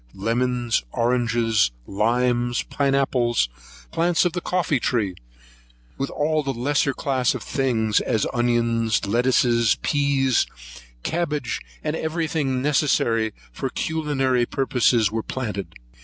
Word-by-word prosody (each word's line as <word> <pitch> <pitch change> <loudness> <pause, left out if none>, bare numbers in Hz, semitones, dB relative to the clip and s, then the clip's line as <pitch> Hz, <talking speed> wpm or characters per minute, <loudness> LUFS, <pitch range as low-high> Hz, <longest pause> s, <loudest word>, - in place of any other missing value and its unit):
Lemons, 120 - 0
oranges, 115 - +1 0.2
limes, 120 - +1
pine 140 -1 0
apples, 120 - +1 0.4
plants 170 +1 +2
of 175 - +1
the 175 - -3
coffee 170 -7 0
tree, 110 -6 0 0.8
with 135 - -3
all 155 +1 0
the 135 -2 -2
lesser 140 +3 +1
class 130 -2 0
of - - -5
things, 115 -6 +1
as 110 - 0
onions, 115 -3 +1
lettuces, 120 +1 +3
peas, 140 -3 +2 0.6
cabbages, 150 -6 -2 0.2
and 150 0 -1
every 160 +1 -2
thing 135 -5 -1
necessary 125 -6 +2 0.2
for 135 - -4
culinary 135 -6 0
purposes, 125 -5 +2
were 110 0 -1
planted. 105 -6 -4
125 Hz, 115 wpm, -23 LUFS, 115-140 Hz, 0.8 s, lettuces